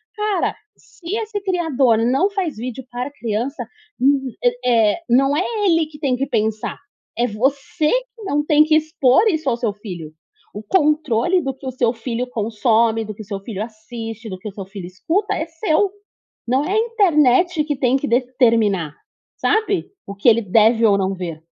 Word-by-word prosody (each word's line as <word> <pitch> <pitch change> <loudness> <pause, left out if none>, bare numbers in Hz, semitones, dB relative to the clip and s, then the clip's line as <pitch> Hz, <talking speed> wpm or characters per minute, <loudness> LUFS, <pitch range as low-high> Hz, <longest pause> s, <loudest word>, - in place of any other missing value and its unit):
Cara, 420 -4 -1 0.2
se 355 +3 -7
esse 435 -2 -4
criador 320 - +2
não 270 +11 +2
faz 385 -6 -3
vídeo 250 +2 -6
para 250 +3 -4
criança, 245 +1 -3 0.4
hum 270 0 +2
eh 245 0 +2 0.4
eh, - - -7
não 270 +4 +3
é 360 - +1 0.2
ele 330 -4 +3
que 300 -1 -14
tem 270 -4 +1
que 265 +2 -1
pensar, 220 -4 -1 0.4
é 240 +1 +2
você 280 +9 0
que - - -3
não 295 -6 0
tem 300 0 +5
que 310 0 +2
expor 310 - +3
isso 315 -7 0
ao 235 - 0
seu 230 -4 -1
filho. 180 -7 -8 0.4
O 210 - -6
controle 305 - +2
do 270 -3 -3
que 265 0 -10
o - - -2
seu 240 -2 +1
filho 240 +1 -4
consome, 225 0 +1
do 215 - -6
que 210 - -11
o - - -9
seu 200 - -2
filho 205 0 -5
assiste, 225 0 -8
do 185 -2 -7
que 210 - -8
o - - -10
seu 195 -1 -7
filho 195 -2 -8
escuta, 320 - -1
é 315 - -2
seu. 325 +4 0 0.6
Não 260 +4 +2
é 365 - -2
a 430 - +2
internet 350 - +3
que 295 -1 -2
tem 255 -1 +2
que 275 - -2
determinar, 230 - +2 0.4
sabe, 420 -4 +1 0.2
o 200 - -7
que 200 +4 +1
ele 230 0 +5
deve 225 +3 +3
ou 200 -1 +4
não 195 0 0
ver. 170 -4 -6
255 Hz, 190 wpm, -20 LUFS, 220-315 Hz, 0.6 s, tem